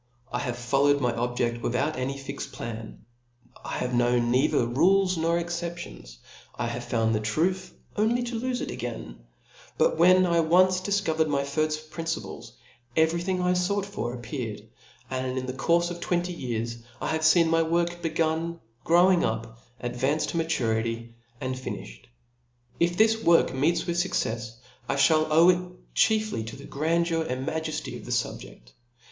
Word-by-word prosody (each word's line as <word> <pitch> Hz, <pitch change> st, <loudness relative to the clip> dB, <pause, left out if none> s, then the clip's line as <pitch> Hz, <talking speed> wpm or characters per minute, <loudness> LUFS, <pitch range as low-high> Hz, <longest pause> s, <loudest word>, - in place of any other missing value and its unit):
I 120 Hz, -, -1 dB
have 125 Hz, -1 st, -3 dB
followed 140 Hz, +4 st, +2 dB
my 125 Hz, -3 st, +1 dB
objc6l 120 Hz, 0 st, -1 dB
without 135 Hz, +7 st, 0 dB
any 130 Hz, +2 st, -3 dB
fixed 140 Hz, 0 st, -6 dB
plan: 115 Hz, -2 st, -7 dB, 0.6 s
I -, -, -4 dB
have 125 Hz, 0 st, -2 dB
known 120 Hz, 0 st, +2 dB
neither 125 Hz, -1 st, +3 dB
rules 185 Hz, +10 st, +3 dB
nor 165 Hz, +1 st, +1 dB
excep'^ 170 Hz, 0 st, -3 dB
lions -, -, -12 dB
J -, -, -24 dB, 0.4 s
I 120 Hz, -, -1 dB
have 120 Hz, +1 st, -4 dB
found 115 Hz, -2 st, +1 dB
the 105 Hz, -, +1 dB
truth, 165 Hz, -, -1 dB, 0.2 s
only 230 Hz, +3 st, +2 dB
to 235 Hz, -1 st, -3 dB
lolfe 250 Hz, +1 st, -2 dB
it -, -, -4 dB
again* -, -, -6 dB, 0.6 s
But -, -, +2 dB
when 185 Hz, +2 st, +6 dB
I 170 Hz, -1 st, +2 dB
had 160 Hz, -1 st, +2 dB
once 185 Hz, +1 st, +5 dB
difcovered 175 Hz, -6 st, +1 dB
my 140 Hz, -2 st, 0 dB
firft 155 Hz, +2 st, -2 dB
principles, 165 Hz, -1 st, -5 dB, 0.4 s
every 160 Hz, +2 st, +3 dB
thing 185 Hz, 0 st, -1 dB
I 180 Hz, 0 st, +3 dB
fought 190 Hz, +2 st, 0 dB
for 125 Hz, -11 st, -4 dB
apr 120 Hz, -, -11 dB
pearcd; 110 Hz, -4 st, -5 dB, 0.5 s
and 130 Hz, 0 st, -2 dB
in 130 Hz, -, -2 dB
the 130 Hz, -, -4 dB
courfe 170 Hz, +5 st, +2 dB
of 175 Hz, -, -6 dB
twenty 175 Hz, 0 st, -1 dB
years, 115 Hz, -5 st, -3 dB, 0.2 s
I -, -, -1 dB
havie 160 Hz, +2 st, +5 dB
feen 165 Hz, -, 0 dB
my 165 Hz, 0 st, +4 dB
work 170 Hz, +1 st, 0 dB
begun, 165 Hz, 0 st, -1 dB, 0.2 s
growing 175 Hz, +2 st, +5 dB
up, 115 Hz, 0 st, -3 dB, 0.2 s
ad 120 Hz, -, -4 dB
vancing 140 Hz, +5 st, 0 dB
to -, -, -3 dB
maturity, 115 Hz, -7 st, -1 dB, 0.3 s
and 130 Hz, -2 st, -2 dB
fini(hed. -, -, -7 dB, 0.7 s
If 175 Hz, +1 st, +2 dB
this 225 Hz, +1 st, +4 dB
work 170 Hz, 0 st, +4 dB
meets 155 Hz, +6 st, +1 dB
with 170 Hz, 0 st, -2 dB
fuccefs, 115 Hz, -, -1 dB, 0.3 s
I -, -, 0 dB
(hall 155 Hz, -1 st, +4 dB
owe 165 Hz, +3 st, +6 dB
It 180 Hz, 0 st, -6 dB
chiefly 215 Hz, -, +2 dB
to 115 Hz, -, -7 dB
the -, -, -11 dB
grandeur 165 Hz, +3 st, 0 dB
and 130 Hz, -4 st, -3 dB
maj«fty 160 Hz, 0 st, -3 dB
of -, -, -12 dB
the -, -, -6 dB
fubje^. -, -, -3 dB
155 Hz, 175 wpm, -27 LUFS, 120-175 Hz, 0.7 s, when